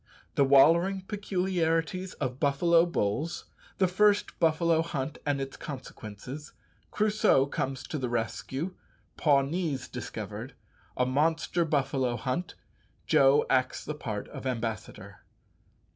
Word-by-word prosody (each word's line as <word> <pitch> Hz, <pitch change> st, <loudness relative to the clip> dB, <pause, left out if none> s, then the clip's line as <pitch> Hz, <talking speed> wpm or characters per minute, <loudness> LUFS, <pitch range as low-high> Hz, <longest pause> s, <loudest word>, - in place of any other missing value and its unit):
_The 140 Hz, -, +4 dB
"wallering" 170 Hz, +8 st, +5 dB
peculiarities 185 Hz, -3 st, -1 dB
of 125 Hz, +1 st, -4 dB
buffalo 165 Hz, +4 st, +4 dB
bulls 150 Hz, +2 st, -1 dB, 0.3 s
The 190 Hz, -, +3 dB
first 205 Hz, +3 st, +2 dB
buffalo 165 Hz, 0 st, +3 dB
hunt 150 Hz, -3 st, -4 dB
and 145 Hz, -1 st, +1 dB
its 135 Hz, 0 st, -5 dB
consequences 130 Hz, +1 st, -8 dB, 0.4 s
Crusoe 210 Hz, -10 st, +3 dB
comes 135 Hz, -2 st, -3 dB
to 155 Hz, -, -4 dB
the 125 Hz, -2 st, -2 dB
rescue 130 Hz, -, -3 dB, 0.4 s
Pawnees 145 Hz, -1 st, +1 dB
discovered -, -, -6 dB, 0.4 s
A 125 Hz, -, +3 dB
monster 160 Hz, +5 st, +1 dB
buffalo 135 Hz, -4 st, 0 dB
hunt 130 Hz, +9 st, -3 dB, 0.5 s
Joe 135 Hz, +1 st, +5 dB
acts 130 Hz, -1 st, +1 dB
the 150 Hz, -, -3 dB
part 110 Hz, -8 st, -5 dB
of -, -, -9 dB
ambassador_. 110 Hz, -5 st, -4 dB
145 Hz, 115 wpm, -29 LUFS, 130-170 Hz, 0.5 s, wallering